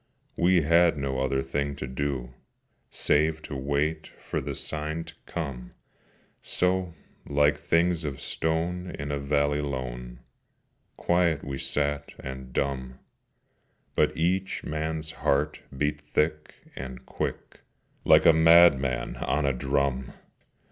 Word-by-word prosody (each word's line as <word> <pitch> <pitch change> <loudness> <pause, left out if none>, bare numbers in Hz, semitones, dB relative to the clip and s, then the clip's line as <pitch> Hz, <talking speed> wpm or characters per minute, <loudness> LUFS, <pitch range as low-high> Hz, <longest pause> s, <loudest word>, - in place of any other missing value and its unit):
We 90 -1 +4
had 85 +1 +4
no 70 -2 -2
other 65 0 0
thing 70 +1 -2
to 70 - -5
do, 65 -2 -3 0.6
Save 80 +1 +1
to 70 - -6
wait 70 +4 -1
for - - -3
the - - -4
sign 80 +1 -3
to 85 0 -12
come: 70 -8 -5 0.7
So, 90 -1 0 0.3
like 75 0 +3
things 85 0 +1
of 70 -3 -4
stone 85 +3 -1
in 75 0 -4
a 70 - -1
valley 70 +1 +1
lone, 60 -3 -5 0.8
Quiet 85 -3 +2
we 70 -1 -4
sat 75 0 -1
and 65 -1 -8
dumb: 65 -1 -2 1.0
But - - +2
each 95 +4 0
man's 80 0 -3
heart 75 0 0 0.2
beat 75 +1 0
thick 75 0 -1 0.2
and 65 -1 -7
quick, - - -5 0.4
Like - - +6
a 80 - +8
madman 80 -5 +5
on 75 +1 0
a 70 - +2
drum! 65 0 -1
75 Hz, 125 wpm, -27 LUFS, 65-80 Hz, 1.0 s, a